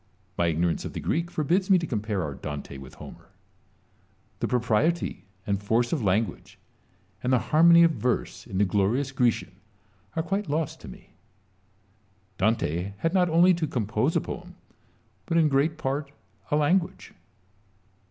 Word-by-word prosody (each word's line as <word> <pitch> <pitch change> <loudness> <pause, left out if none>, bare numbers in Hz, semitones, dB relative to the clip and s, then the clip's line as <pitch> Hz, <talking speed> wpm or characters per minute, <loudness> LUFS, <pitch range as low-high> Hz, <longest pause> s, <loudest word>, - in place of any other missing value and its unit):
My 85 - +1
ignorance 85 +1 0
of - - -6
the - - -4
Greek 170 +1 -1
forbids 175 +5 0
me 190 - +7
to 170 - -2
compare 105 - -2
our 75 -2 -4
Dante 70 0 -7
with 65 -1 -12
Homer. - - -12 1.1
The - - -1
propriety 125 +6 0 0.2
and 100 -1 -1
force 115 +5 +1
of 155 - 0
language 105 +2 -1 0.6
and 125 - -1
the 130 - +5 0.2
harmony 170 +2 +7
of 165 - +5
verse 125 -5 -2
in 100 -5 -5
the 100 - +4
glorious 105 +8 0
Grecian 120 -7 0 0.6
are 160 - 0
quite 195 +1 -2
lost 155 +1 -2
to - - -10
me. - - -13 1.3
Dante 100 -3 0
had 165 - -1
not 180 -2 +3
only 175 +3 +5
to 165 -2 -1
compose 120 +4 -1
a - - +3
poem, 180 -2 -8 0.7
but 170 - +1
in 160 -2 +5
great 145 +3 +1
part 140 0 -3 0.4
a - - +1
language. 170 +4 0
135 Hz, 155 wpm, -26 LUFS, 105-165 Hz, 1.3 s, me